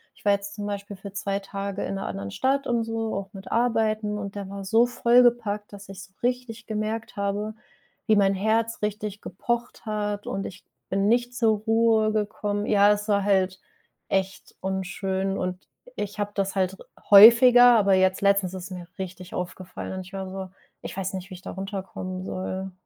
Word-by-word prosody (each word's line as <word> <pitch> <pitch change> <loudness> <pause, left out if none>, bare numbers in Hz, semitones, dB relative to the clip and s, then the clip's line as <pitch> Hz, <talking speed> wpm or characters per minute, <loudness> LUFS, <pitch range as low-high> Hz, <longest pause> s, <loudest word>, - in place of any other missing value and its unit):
Ich - - -22
war 205 - +5
jetzt 200 0 -1
zum 205 - -5
Beispiel 200 0 -5
für 195 +1 -9
2 200 -1 -2
Tage 195 0 -5
in - - -3
'ner 195 - -4
anderen 100 0 -5
Stadt 275 - 0
und 235 -1 +1
so, 225 0 -3
auch 195 +1 -5
mit 195 -1 -10
Arbeiten, 220 -3 +1
und 200 -1 -5
der 200 -2 -5
war 200 0 -6
so 225 +5 +4
vollgepackt, 240 -4 +3
dass 200 -1 -11
ich 195 0 -8
so 190 - -17
richtig 245 -2 -2
gemerkt 215 +2 -3
habe, 205 +2 -2 0.5
wie 215 - +5
mein 195 -1 +4
Herz 220 +4 0
richtig 210 -1 -3
gepocht 235 +7 -4
hat 210 -1 -2
und 195 - -3
ich 190 - -9 0.3
bin 195 +1 +1
nicht 240 +2 +1
zur 225 -3 +3
Ruhe 220 0 +3
gekommen. 205 -1 -2
Ja, 205 -1 +5
das 210 0 +1
war 200 -1 +3
halt 190 -2 +1 0.5
echt 190 0 -2
unschön. 190 0 -2
Und 185 0 -4 0.3
ich 205 +1 -5
habe 205 0 -1
das 195 -1 -1
halt 190 -1 +1
r - - -13 0.2
häufiger. 240 +4 +9
Aber 200 -2 +4
jetzt 185 0 +2
letztens 200 -2 +2
ist 185 -2 -6
es - - -9
mir 180 -1 -7
richtig 185 -1 -7
aufgefallen. 180 +1 -6
Und 190 - -4
ich 195 - -15
war 190 -1 -5
so, 190 0 -6 0.3
ich - - -6
weiß 190 0 -3
nicht, 190 +1 -7
wie - - -6
ich 180 - -10
da - - -8
runterkommen 190 -1 -5
soll. 190 0 -4
200 Hz, 195 wpm, -25 LUFS, 190-220 Hz, 0.5 s, häufiger